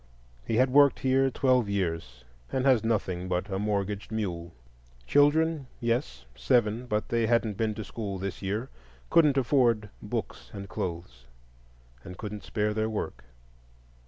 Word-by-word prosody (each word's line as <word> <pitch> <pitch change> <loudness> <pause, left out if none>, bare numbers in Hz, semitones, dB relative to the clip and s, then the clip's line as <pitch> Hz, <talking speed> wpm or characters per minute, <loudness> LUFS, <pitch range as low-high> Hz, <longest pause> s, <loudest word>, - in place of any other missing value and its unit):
He 115 - -2
had 130 +2 +3
worked 140 0 +5
here 135 0 +3
twelve 125 -4 +2
years 80 -11 -3 0.3
and 130 -1 0
has 130 -5 +4
nothing 95 -5 -1
but 90 +3 -2
a 95 - -1
mortgaged 105 0 -2
mule. 90 -6 -3 0.5
Children? 145 - +3
Yes, 65 - -2
seven; 120 - +1
but 105 -2 -1
they 115 -1 +1
hadn't 115 -3 +1
been 110 0 -1
to 110 - -5
school 100 -3 -5
this 95 -1 -5
year,—couldn't 105 - 0
afford 120 -5 +2
books 60 - -5
and 100 0 -6
clothes, 85 -11 -5 0.8
and 90 -1 -9
couldn't 105 -1 -6
spare 105 0 -1
their 110 +1 0
work. 105 - -4
105 Hz, 140 wpm, -28 LUFS, 95-125 Hz, 0.8 s, worked